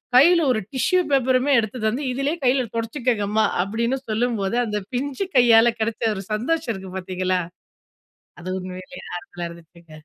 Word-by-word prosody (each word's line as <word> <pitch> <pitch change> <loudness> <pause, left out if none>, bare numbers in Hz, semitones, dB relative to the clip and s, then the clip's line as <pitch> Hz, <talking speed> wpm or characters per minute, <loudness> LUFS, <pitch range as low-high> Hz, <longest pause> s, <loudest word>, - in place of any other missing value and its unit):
கையில 335 +5 +7
ஒரு 220 - 0
டிஷ்யூ 365 +8 +2
பேப்பருமே 260 +1 +3
எடுத்து 225 +3 -3
தந்து, 250 +7 -1
"இதுலயே 280 +6 -1
கையில 255 0 +3
துடச்சுக்கோங்கம்மா" 225 -3 0 0.2
அப்டின்னு 235 +6 -1
சொல்லும்போது, 225 -2 0
அந்த 210 -1 -2 0.2
பிஞ்சு 285 +9 -2
கையால 235 -1 +6
கெடச்ச 220 0 0
ஒரு 195 - -5
சந்தோஷம் 255 +3 -1
இருக்கு 190 -1 -9
பாத்தீங்களா, 185 0 -1 1.0
அது 185 +1 -6
உண்மையிலயே 185 0 -9
ஆறுதல 175 -1 -6
இருந்துச்சுங்க. 170 0 -16
230 Hz, 135 wpm, -23 LUFS, 195-260 Hz, 1.0 s, கையில